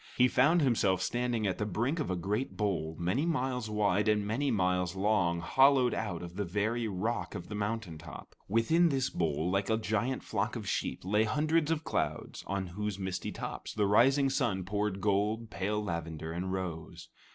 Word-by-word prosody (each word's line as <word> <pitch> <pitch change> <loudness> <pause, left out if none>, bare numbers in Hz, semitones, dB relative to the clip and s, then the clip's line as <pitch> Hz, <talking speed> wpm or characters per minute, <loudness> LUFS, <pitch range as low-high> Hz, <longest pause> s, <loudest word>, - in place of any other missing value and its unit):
He 125 - +6
found 150 +7 +4
himself 100 -8 +2
standing 120 +2 -1
at 95 - -1
the 105 - 0
brink 120 - -1
of 150 - -2
a 95 - 0
great 105 +9 -2
bowl, 90 -7 -1
many 90 - 0
miles 130 -8 -1
wide 105 -1 +1
and 105 -1 +2
many 125 +7 0
miles 90 -4 +1
long, 95 -4 +1
hollowed 130 +5 +4
out 100 -6 -3
of 85 0 -8
the 100 - 0
very 110 +5 -1
rock 110 +4 -2
of 90 - -7
the - - -5
mountaintop. 100 -7 -5
Within 135 - +3
this 135 -3 0
bowl, 80 +1 0
like 100 +1 0
a 110 - +3
giant 110 +4 -1
flock 105 +3 -2
of 110 -4 -5
sheep, - - -2
lay 105 +3 +3
hundreds 155 +7 +1
of 160 -1 0
clouds - - -2
on 100 0 -2
whose 100 +2 -4
misty 95 -2 -3
tops - - -6
the 105 -2 +2
rising 135 +7 +4
sun 115 -9 0
poured 100 0 -1
gold, 105 +3 0
pale 105 +2 -1
lavender, 80 -4 -4
and 90 +3 -3
rose. 85 -2 -5
105 Hz, 185 wpm, -31 LUFS, 95-120 Hz, -, He